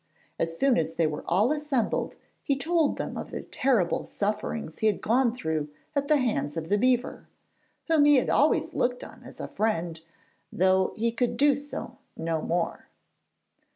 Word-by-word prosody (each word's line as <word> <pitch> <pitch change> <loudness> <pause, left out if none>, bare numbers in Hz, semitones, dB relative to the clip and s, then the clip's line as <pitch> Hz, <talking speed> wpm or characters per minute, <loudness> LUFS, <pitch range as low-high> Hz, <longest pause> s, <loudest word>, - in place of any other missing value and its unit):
As 165 0 -2
soon 270 -3 +3
as 160 0 -2
they 165 - +2
were 150 -1 -3
all 205 +9 +3
assembled 295 -6 -1 0.3
he 280 - 0
told 325 +1 +1
them - - -4
of - - -7
the - - -6
terrible 240 -10 0
sufferings 210 -3 -3
he 220 - +2
had 210 - +1
gone 240 +2 +2
through 160 -10 -3 0.3
at 280 0 0
the 300 - +4
hands 155 - -1
of 165 0 -4
the 205 - +3
beaver, 250 +1 +1 0.6
whom 320 -3 +4
he 295 0 +7
had 255 - +2
always - - +2
looked 245 0 0
on - - -12
as - - -13
a - - -4
friend, 170 -7 -1 0.5
though 190 +1 +3
he 230 +1 +1
could 235 +1 -1
do 285 -1 +5
so 285 +1 -7 0.2
no 165 -1 -1
more. 170 +1 -2
225 Hz, 175 wpm, -27 LUFS, 170-270 Hz, 0.6 s, he